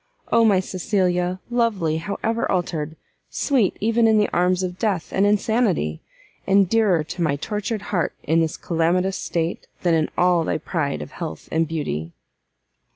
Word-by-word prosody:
Oh 230 - +5
my 205 -4 +5
Cecilia! 185 -1 0
lovely, 210 -10 +1
however 210 +7 -2
altered! 160 -4 -2 0.3
sweet 255 -9 +1
even 230 +2 +3
in 220 -1 +4
the 210 - +2
arms 180 +1 +2
of 180 0 -4
death 200 -7 -1
and 195 +1 +3
insanity! 205 - +1 0.5
and 195 0 +4
dearer 200 -6 +3
to 160 +3 -6
my 155 -4 +2
tortured 210 +6 -3
heart 175 -4 0
in 160 +2 +2
this 160 -1 -1
calamitous 180 +3 0
state, 165 0 -3 0.2
than 175 -2 +3
in 160 -1 +2
all 180 -2 +3
thy - - -1
pride 155 -2 -2
of - - -11
health 165 -3 -7
and 160 0 +1
beauty!" 85 - -3
180 Hz, 160 wpm, -22 LUFS, 165-210 Hz, 0.5 s, Oh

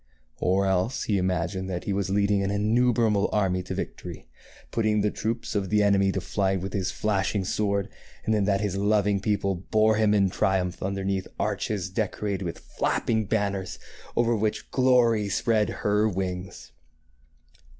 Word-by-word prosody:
Or 95 +2 +2
else 95 +6 0
he 100 -3 +1
imagined 90 +1 -1
that 90 -1 -3
he 100 - -2
was 95 0 -1
leading 100 0 +2
an 100 - 0
innumerable 110 0 +2
army 95 -3 +1
to 90 - -5
victory, - - -6 0.4
putting 110 -2 +1
the 105 0 +1
troops 115 +2 -3
of 100 -3 -1
the 105 0 +3
enemy 100 -1 +3
to - - -1
flight 95 -1 0
with 95 0 -5
his 95 -2 -1
flashing 100 -1 -1
sword, 100 0 0 0.4
and 110 - +1
then 105 -2 +2
that 100 0 +1
his 100 -3 -1
loving 100 0 +2
people 100 -1 0
bore 110 +4 +2
him 105 -1 +3
in 100 -2 +3
triumph 90 -2 0
underneath 95 0 -2
arches 100 -4 -1
decorated 100 -1 -2
with 85 - -4
flapping 110 -1 -1
banners, 100 -3 -1 0.4
over 120 0 +2
which 110 0 -2
Glory 120 -5 +3
spread 110 +2 +1
her 105 +1 +1
wings. 90 -1 -5
100 Hz, 160 wpm, -26 LUFS, 95-105 Hz, 0.4 s, the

